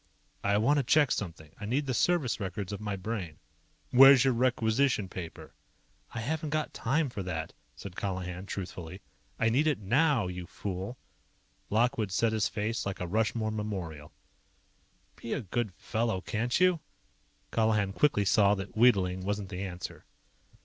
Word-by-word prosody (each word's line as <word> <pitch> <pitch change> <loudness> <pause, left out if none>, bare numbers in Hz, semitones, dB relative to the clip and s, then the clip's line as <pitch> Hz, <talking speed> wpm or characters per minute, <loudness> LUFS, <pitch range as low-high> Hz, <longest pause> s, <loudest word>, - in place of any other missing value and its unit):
"I 100 0 +3
want 140 +8 +3
to 140 - +2
check 145 +2 +4
something. 85 -6 -4
I 105 - -5
need 135 +6 0
the 130 - -1
service 155 -3 +1
records 95 0 -4
of 100 - -5
my 105 -2 -2
Brain." 95 -5 -5 0.5
"Where's 135 0 +9
your 130 - +4
Requisition 120 -2 +2
Paper?" 85 -3 -8 0.6
"I 115 - -2
haven't 155 +5 -2
got 155 0 -1
time 145 +6 0
for 120 -6 -5
that," 80 -3 -4 0.2
said 95 -2 -9
Colihan 95 -1 -4
truthfully. 90 -1 -6 0.4
"I 115 - +2
need 140 +7 +2
it 150 - +2
now, 125 - +2
you 90 -1 -5
fool." 100 +5 -5 0.7
Lockwood 110 -2 +1
set 110 +4 +2
his 110 -2 +2
face 110 +2 -2
like 100 -1 -4
a 90 - -2
Rushmore 110 +3 0
memorial. 95 -9 -5 1.1
"Be 115 - -4
a - - -1
good 110 +1 -2
fellow, 115 -4 -1
can't 115 +5 -1
you?" 180 -2 +4 0.7
Colihan 105 -3 +2
quickly 105 -7 +2
saw 100 0 +4
that 95 +1 -7
wheedling 95 -6 +4
wasn't 100 0 -2
the 95 -1 -5
answer. 90 -2 -7
105 Hz, 155 wpm, -30 LUFS, 95-125 Hz, 1.1 s, Where's